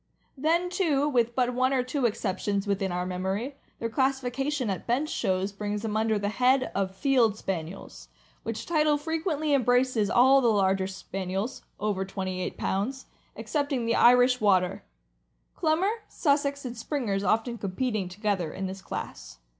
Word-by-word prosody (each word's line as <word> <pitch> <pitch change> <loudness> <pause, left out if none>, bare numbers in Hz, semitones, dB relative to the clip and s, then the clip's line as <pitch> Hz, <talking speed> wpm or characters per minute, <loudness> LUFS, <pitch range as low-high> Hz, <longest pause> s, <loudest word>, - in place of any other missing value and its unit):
Then, 335 +5 +1
too, 305 -7 +1
with 240 -4 +1
but 250 -1 +1
one 255 +2 +2
or 255 -2 +2
two 255 0 0
exceptions, 200 -1 -2
within 200 -2 -1
our 180 0 -2
memory, 190 +9 -3 0.2
their 230 - -2
classification 265 +2 0
at 185 - -5
bench 265 +6 +1
shows 190 -4 0
brings 205 +1 -4
them 215 -1 -2
under 220 0 +2
the 205 0 -1
head 255 +4 +2
of 195 -1 0
l - - -19
' - - -26
Field 240 -4 +3
Spaniels," 185 -2 -6 0.3
which 225 -1 -5
title 305 -3 +2
frequently 310 -1 -1
embraces 245 -4 +2
all 265 +3 +6
the 245 - +3
larger 195 -3 +2
Spaniels 195 +4 -4 0.2
(over 205 -2 -1
twenty 190 -1 -4
eight - - -4
pounds) 255 +8 -2 0.3
excepting 285 -5 -1
the 230 - +1
Irish 250 0 +5
Water; 185 -4 +2 0.7
Clumber, 330 +6 +2 0.2
Sussex, 280 -2 0
and 245 -1 -5
Springers 225 -5 -2
often 225 +3 0
competing 200 0 -2
together 190 -4 -1
in 195 - -4
this 190 +1 -6
class. - - -7
230 Hz, 160 wpm, -27 LUFS, 195-270 Hz, 0.7 s, all